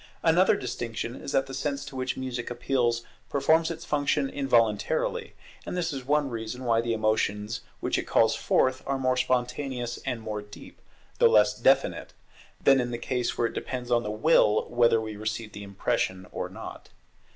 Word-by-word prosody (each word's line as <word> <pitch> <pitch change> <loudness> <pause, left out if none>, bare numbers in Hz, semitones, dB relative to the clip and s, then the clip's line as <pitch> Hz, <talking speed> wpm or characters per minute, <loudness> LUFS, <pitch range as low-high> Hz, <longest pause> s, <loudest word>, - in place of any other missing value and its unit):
Another 175 +3 +5
distinction 120 -2 -4
is 140 - -7
that 135 - +2
the 135 - -9
sense 140 +1 -2
to 140 -1 -9
which 130 0 -2
music 125 -2 -4
appeals 120 -1 0 0.3
performs 160 +3 +3
its 165 -1 -6
function 145 -2 0
involuntarily; 115 -7 +1 0.3
and - - -5
this 170 -3 -1
is 135 -2 -5
one 145 +2 +2
reason 115 +2 -5
why 115 -2 +2
the 115 -1 -1
emotions 110 0 0 0.2
which - - 0
it - - -5
calls - - +4
forth 130 0 +1
are 135 0 0
more 130 -1 +1
spontaneous 125 0 -1
and 125 -3 -2
more 105 -1 -4
deep, 105 0 -13 0.4
though 475 - +7
less 460 - +5
definite, - - +2 0.5
than 135 -1 +5
in 120 - -2
the 120 - -3
case 125 0 -2
where 120 - +2
it - - -2
depends 125 -1 -5
on 120 -1 +4
the 105 - -4
will 105 -1 +3
whether 120 -1 +4
we 110 -1 -5
receive 110 +1 -4
the 105 - -9
impression 95 -1 -2
or - - -4
not. - - -9
125 Hz, 180 wpm, -27 LUFS, 115-135 Hz, 0.5 s, though